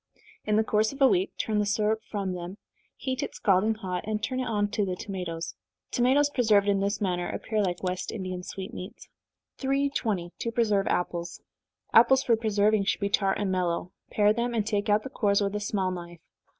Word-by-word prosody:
In 210 - +1
the 220 - +4
course 215 0 +1
of 275 - -10
a 270 - +7
week 190 -5 +1
turn 215 -1 0
the 210 - +2
syrup 215 +1 +1
from 195 -3 -2
them, 180 +2 -6 0.4
heat 260 -1 -3
it - - -4
scalding 205 +3 +2
hot, 185 -4 -4
and 215 -1 -2
turn 255 -1 -1
it 255 - -2
on 205 -2 +1
to 205 - 0
the 185 -2 -2
tomatoes. 180 -5 -5 0.4
Tomatoes 275 +4 +3
preserved 215 -6 +3
in 200 -1 +3
this 200 +2 0
manner 180 -3 -1
appear 215 -1 -2
like 180 -2 -2
West 185 0 -2
Indian 185 -3 -4
sweetmeats. 185 +1 -8 0.5
320. 265 -10 0
To 230 - -2
Preserve 215 -4 +1
Apples. 170 -1 -2 0.5
Apples 260 +4 +6
for 235 - +4
preserving 215 -2 +2
should - - 0
be 200 - 0
tart 195 -1 +1
and 200 -2 -1
mellow 180 -1 -1 0.2
pare 210 0 +3
them, 235 +1 -1
and 215 -3 +1
take 205 -1 -1
out 210 +1 +3
the - - -6
cores 200 -6 +2
with 200 0 -1
a - - 0
small 200 -3 -1
knife. 175 -1 -7
205 Hz, 200 wpm, -27 LUFS, 185-220 Hz, 0.5 s, a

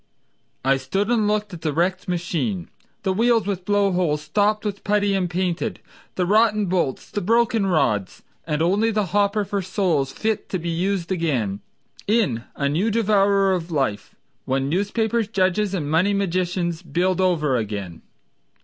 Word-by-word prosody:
I 135 0 +4
stood 195 - -1
and 220 -3 +2
hooked 210 -1 -1
at 170 - -8
the 155 - -1
wrecked 180 +3 0
machine— 175 +2 -2 0.3
The 190 -1 +1
wheels 230 +1 +2
with 190 -3 -3
blow 205 -1 +2
holes 160 -5 0
stopped 205 +6 +1
with 200 -1 -4
putty 205 -1 +1
and 185 -2 0
painted; 180 +3 -2 0.4
The 180 - 0
rotten 215 +1 +3
bolts, 175 -8 -1
the 205 - -2
broken 225 0 +2
rods; 120 - 0 0.2
And 150 0 0
only 200 +6 +2
the 210 -2 0
hopper 205 0 +2
for 200 +1 -2
souls 175 -7 0
fit 220 -1 -2
to 185 - -1
be 170 0 -4
used 180 +1 -1
again 130 - -1 0.5
In 195 - +1
a 140 - 0
new 170 +10 +1
devourer 200 -3 +3
of 175 -2 -3
life, 130 -10 -2 0.3
When 135 +1 0
newspapers, 220 +5 0
judges 195 0 +1
and 155 -6 -2
money 175 +7 +2
magicians 180 -3 -1
Build 185 +1 0
over 155 -7 +2
again. 100 -6 -4
185 Hz, 160 wpm, -22 LUFS, 165-205 Hz, 0.5 s, I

